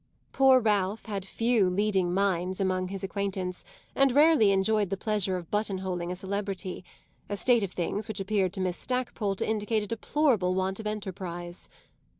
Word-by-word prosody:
Poor 265 Hz, -1 st, +6 dB
Ralph 210 Hz, -2 st, 0 dB
had 200 Hz, -3 st, -4 dB
few 225 Hz, -3 st, +2 dB
leading 190 Hz, -1 st, +1 dB
minds 185 Hz, -1 st, 0 dB
among 185 Hz, -1 st, 0 dB
his 195 Hz, 0 st, -6 dB
acquaintance 190 Hz, -2 st, -3 dB, 0.3 s
and 275 Hz, -1 st, +4 dB
rarely 290 Hz, -5 st, +5 dB
enjoyed 200 Hz, +1 st, +2 dB
the 195 Hz, -, -2 dB
pleasure 200 Hz, -2 st, 0 dB
of 170 Hz, -2 st, -9 dB
buttonholing 190 Hz, -4 st, -2 dB
a -, -, -3 dB
celebrity; 195 Hz, -1 st, -4 dB, 0.5 s
a 205 Hz, -, -2 dB
state 240 Hz, +4 st, +3 dB
of 195 Hz, -3 st, -3 dB
things 200 Hz, +5 st, -2 dB
which 215 Hz, -3 st, -4 dB
appeared 195 Hz, -2 st, 0 dB
to 195 Hz, -, -4 dB
Miss 185 Hz, -1 st, -1 dB
Stackpole 245 Hz, -5 st, -2 dB
to -, -, -2 dB
indicate 215 Hz, 0 st, 0 dB
a -, -, -4 dB
deplorable 225 Hz, -4 st, +1 dB
want 190 Hz, +1 st, -1 dB
of 215 Hz, -, -4 dB
enterprise. 185 Hz, -4 st, -6 dB
195 Hz, 165 wpm, -28 LUFS, 185-215 Hz, 0.5 s, Poor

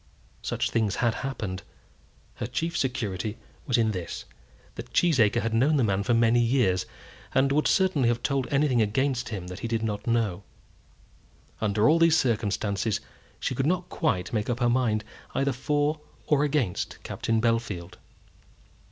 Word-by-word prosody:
Such -, -, -2 dB
things 110 Hz, -3 st, +1 dB
had 120 Hz, -2 st, +1 dB
happened. 105 Hz, -9 st, -4 dB, 0.8 s
Her -, -, -3 dB
chief 165 Hz, +1 st, -2 dB
security 110 Hz, -5 st, -2 dB, 0.3 s
was 125 Hz, -, +2 dB
in 110 Hz, -2 st, +2 dB
this, 90 Hz, -4 st, -5 dB, 0.5 s
that -, -, -9 dB
Cheesacre 120 Hz, -10 st, +3 dB
had 115 Hz, 0 st, -1 dB
known 135 Hz, +7 st, +3 dB
the 135 Hz, -, +3 dB
man 100 Hz, -2 st, +1 dB
for 115 Hz, +4 st, +1 dB
many 115 Hz, +1 st, +4 dB
years, 115 Hz, -7 st, +2 dB, 0.5 s
and 135 Hz, +1 st, +3 dB
would 150 Hz, +2 st, +2 dB
certainly 185 Hz, -, +3 dB
have 120 Hz, 0 st, -1 dB
told 135 Hz, -1 st, 0 dB
anything 135 Hz, -4 st, +2 dB
against 130 Hz, +4 st, 0 dB
him 100 Hz, -6 st, -5 dB
that 90 Hz, 0 st, -7 dB
he -, -, -3 dB
did 115 Hz, -1 st, -1 dB
know. 105 Hz, -2 st, -1 dB, 1.2 s
Under 105 Hz, +1 st, +2 dB
all 165 Hz, +2 st, +5 dB
these 165 Hz, -1 st, +5 dB
circumstances, 105 Hz, -3 st, 0 dB, 0.4 s
she -, -, -1 dB
could 135 Hz, +3 st, 0 dB
not 180 Hz, +1 st, 0 dB
quite 100 Hz, -, -1 dB
make 105 Hz, 0 st, -1 dB
up 120 Hz, 0 st, -1 dB
her 120 Hz, -1 st, +3 dB
mind 120 Hz, -4 st, +1 dB, 0.3 s
either 135 Hz, 0 st, +1 dB
for 145 Hz, +3 st, 0 dB, 0.2 s
or 150 Hz, -1 st, +3 dB
against 140 Hz, -11 st, -1 dB
Captain 115 Hz, 0 st, -1 dB
Bellfield. 105 Hz, -7 st, -1 dB
115 Hz, 155 wpm, -27 LUFS, 105-135 Hz, 1.2 s, all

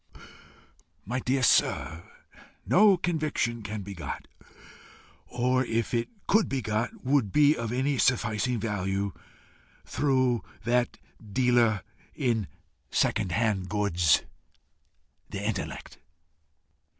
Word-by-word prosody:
My 125 Hz, +6 st, -2 dB
dear 130 Hz, +1 st, 0 dB
sir, 85 Hz, -7 st, +2 dB, 0.6 s
no 200 Hz, 0 st, +5 dB
conviction 155 Hz, -9 st, -1 dB
can 105 Hz, -1 st, -5 dB
be 100 Hz, +1 st, -7 dB
got, 85 Hz, -6 st, -6 dB, 1.0 s
or 125 Hz, +1 st, +1 dB
if 115 Hz, -1 st, -2 dB
it 115 Hz, -1 st, 0 dB, 0.2 s
could 215 Hz, +1 st, +3 dB
be 135 Hz, -, -1 dB
got, 110 Hz, +1 st, -3 dB
would 130 Hz, -7 st, +2 dB
be 150 Hz, +4 st, +5 dB
of 115 Hz, -4 st, -4 dB
any 130 Hz, +2 st, 0 dB
sufficing 120 Hz, -1 st, +1 dB
value, 100 Hz, -2 st, -2 dB, 0.7 s
through 130 Hz, -4 st, +1 dB, 0.2 s
that 120 Hz, +1 st, +1 dB, 0.3 s
dealer 115 Hz, -2 st, +2 dB, 0.3 s
in 115 Hz, -7 st, 0 dB, 0.4 s
second 95 Hz, +3 st, +1 dB
hand 105 Hz, -5 st, 0 dB
goods, 90 Hz, -6 st, +2 dB, 1.1 s
the 100 Hz, +1 st, -5 dB
intellect. 105 Hz, -3 st, -4 dB
115 Hz, 100 wpm, -28 LUFS, 105-130 Hz, 1.1 s, no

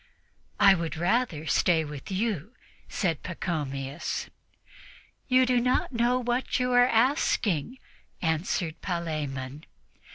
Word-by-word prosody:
"I 200 Hz, -1 st, +8 dB
would 165 Hz, -3 st, -3 dB
rather 175 Hz, -2 st, 0 dB
stay 160 Hz, -1 st, +2 dB
with 145 Hz, -2 st, -8 dB
you," 205 Hz, -, -2 dB, 0.3 s
said 165 Hz, -7 st, -1 dB
Pachomius. 145 Hz, -4 st, -4 dB, 1.0 s
"You 255 Hz, -1 st, +5 dB
do 250 Hz, -1 st, +3 dB
not 250 Hz, +2 st, +1 dB
know 240 Hz, +1 st, +2 dB
what 245 Hz, +1 st, -1 dB
you 250 Hz, 0 st, 0 dB
are 245 Hz, 0 st, +6 dB
asking," 230 Hz, -, +1 dB, 0.4 s
answered 160 Hz, 0 st, -1 dB
Palemon. 150 Hz, -5 st, -4 dB
180 Hz, 105 wpm, -27 LUFS, 155-245 Hz, 1.0 s, I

